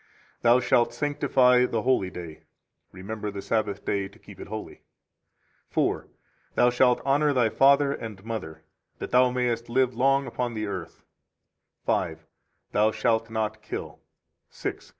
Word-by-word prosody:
Thou 120 +1 +5
shalt 120 -1 +2
sanctify 130 -4 +3
the 115 -3 -2
holy 125 -8 +2
day. 85 -4 -9 0.5
[Remember 105 +3 -5
the 100 -1 -6
Sabbath 105 -3 -1
day 100 -1 -1
to - - -19
keep - - -15
it - - -8
holy.] - - -7 0.9
4 - - 0
4. - - -31 0.5
Thou 120 - +5
shalt 125 0 +3
honor 145 +2 +3
thy 120 -4 +3
father 140 +4 +4
and 110 -6 -8
mother 80 -9 -6 0.3
[that - - -6
thou 125 0 +5
mayest 120 -2 -1
live 130 +1 +2
long 135 +3 +2
upon 120 -3 -3
the 110 0 -2
earth]. 95 -5 -6 0.8
5 80 -4 0
5. 80 0 -31 0.4
Thou 105 +1 +3
shalt 115 0 0
not 110 -1 -2
kill. 105 - -6 0.5
6 - - -5
6. - - -19
115 Hz, 155 wpm, -26 LUFS, 105-125 Hz, 0.9 s, Thou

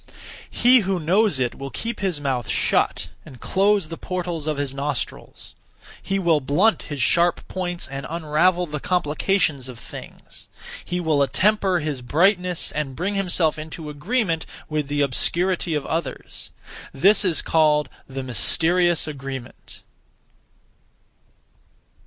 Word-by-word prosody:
He 250 +1 +5
(who 195 -3 -1
knows 180 0 +2
it) 125 -2 0
will 135 0 -7
keep 230 - -5
his 185 -6 -1
mouth 130 -6 -2
shut - - +1
and 130 - -13
close 195 -2 +1
the 165 - -7
portals 175 -4 -4
(of 155 -2 -1
his 140 -2 -2
nostrils). 140 -3 -5 0.5
He 195 - -2
will 170 -5 +3
blunt 175 +12 +2
his 145 -2 -5
sharp 175 +3 +2
points 175 -2 -3
and 135 0 -6
unravel 170 +3 +1
the 150 -2 -5
complications 155 -4 0
of 125 - -9
things; 115 - -11 0.4
he 180 - -3
will 160 -4 +1
attemper 190 +3 +2
his 145 -4 -3
brightness, 180 - +2
and 140 -3 -4
bring 190 +7 -2
himself 180 -5 +2
into 155 0 -7
agreement 165 - -1 0.2
with 155 -2 -2
the 145 0 -1
obscurity 170 +5 +1
(of 150 - -2
others). 165 +1 -5 0.4
This 195 +10 +4
is 180 -5 +2
called 150 -2 +3 0.2
'the 135 0 -5
Mysterious 165 - +2
Agreement.' 135 -4 -8
160 Hz, 135 wpm, -22 LUFS, 145-185 Hz, 0.5 s, He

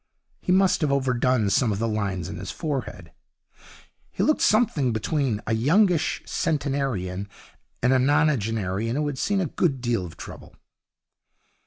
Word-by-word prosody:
He - - -1
must 190 0 +3
have 150 -3 +1
overdone 125 -5 +1
some 120 -1 +2
of 100 - -1
the 115 +2 -1
lines 100 -5 -2
on 100 - -6
his 95 +1 -6
forehead. 145 -5 -4 1.0
He - - -2
looked 305 - +2
something 200 - +3
between 115 0 -1
a 110 - -1
youngish 165 - +2
centenarian 130 - -2 0.5
and 125 +1 +4
a 130 - +4
nonagenarian 115 - +1
who 150 +1 0
had 145 -3 -3
seen 200 -1 +1
a - - 0
good 145 -3 0
deal 120 -5 -1
of 85 -2 -9
trouble. - - -11
130 Hz, 150 wpm, -25 LUFS, 110-150 Hz, 1.0 s, and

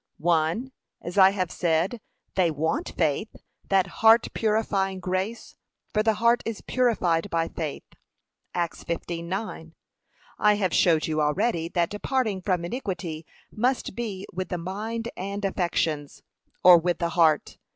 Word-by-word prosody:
1. 170 +9 +1 0.3
As 175 +3 -6
I 190 0 +9
have 185 -3 -2
said, 175 +7 0 0.3
they 185 -3 +3
want 160 +1 -2
FAITH, 155 +9 0 0.3
that 195 -2 +4 0.2
heart 225 +1 +6
purifying 205 -3 0
grace, 185 +5 -3 0.4
for 215 - +3
the 220 0 +2
heart 235 +3 +3
is 225 -2 -5
purified 205 -8 +1
by 165 -1 0
faith. 155 -4 -5 0.7
(Acts 170 -2 -2
15:9) 170 0 -4 0.7
I 210 0 +5
have 190 -4 0
showed 160 -3 +4
you 155 -1 0
already 165 +2 0
that 170 -1 0
departing 210 -2 -1
from 180 -2 0
iniquity 175 - -5 0.2
must 250 +4 0
be 205 -5 -4
with 185 +1 -4
the 180 - -2
mind 220 +6 -4
and 200 +2 -4
affections, 165 -6 -1 0.4
or 180 -2 +9
with 175 0 0
the 170 - -1
heart. 160 -3 +2
185 Hz, 140 wpm, -26 LUFS, 170-215 Hz, 0.7 s, I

